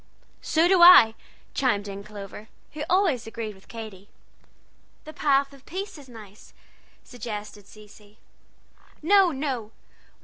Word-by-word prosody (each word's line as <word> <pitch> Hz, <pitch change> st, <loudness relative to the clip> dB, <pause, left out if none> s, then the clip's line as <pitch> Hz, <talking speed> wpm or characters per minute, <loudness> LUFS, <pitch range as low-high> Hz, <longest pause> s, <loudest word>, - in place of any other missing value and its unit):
"So 325 Hz, +2 st, +2 dB
do 370 Hz, -1 st, +3 dB
I!" 345 Hz, -11 st, +9 dB, 0.4 s
chimed 205 Hz, -6 st, 0 dB
in 200 Hz, 0 st, -8 dB
Clover, 210 Hz, 0 st, -10 dB, 0.3 s
who 300 Hz, 0 st, -5 dB
always 350 Hz, -, +1 dB
agreed 225 Hz, -1 st, -6 dB
with 190 Hz, -1 st, -21 dB
Katy. 215 Hz, -4 st, -10 dB, 0.9 s
"The 310 Hz, -, -11 dB
Path 280 Hz, -2 st, +1 dB
of 275 Hz, -1 st, -17 dB
Peace 390 Hz, +4 st, -6 dB
is 270 Hz, -3 st, -15 dB
nice," 215 Hz, -3 st, -15 dB, 0.5 s
suggested 210 Hz, -4 st, -8 dB
Cecy. 210 Hz, 0 st, -17 dB, 0.9 s
"No, 385 Hz, +1 st, +4 dB
no! 265 Hz, -6 st, -4 dB
230 Hz, 125 wpm, -25 LUFS, 210-305 Hz, 0.9 s, I